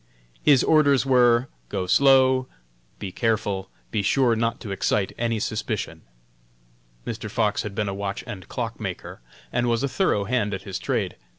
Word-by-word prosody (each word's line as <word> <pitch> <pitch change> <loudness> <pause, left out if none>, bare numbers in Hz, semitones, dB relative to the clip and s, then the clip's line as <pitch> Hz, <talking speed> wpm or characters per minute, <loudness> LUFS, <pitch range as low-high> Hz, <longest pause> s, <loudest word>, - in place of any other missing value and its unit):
"His 140 -4 +5
orders 145 -4 +4
were: 125 -1 +4 0.2
Go 95 -2 -2
slow; 130 +3 +4 0.5
be 95 - -6
careful; 105 -3 -1 0.2
be 105 - 0
sure 120 +3 +3
not 115 +1 -1
to 105 - -6
excite 95 0 0
any 115 -2 -1
suspicion." - - -3 1.0
Mr. - - -5
Fox - - 0
had 105 -2 -6
been 105 -1 -1
a 100 - -2
watch 100 0 -4
and 95 -4 -8
clock - - -4
maker, - - -6 0.3
and 120 0 +1
was 115 +2 +1
a - - +2
thorough 135 - +1
hand 105 -2 0
at 95 - -8
his 95 -2 -5
trade. - - -2
115 Hz, 165 wpm, -24 LUFS, 100-130 Hz, 1.0 s, His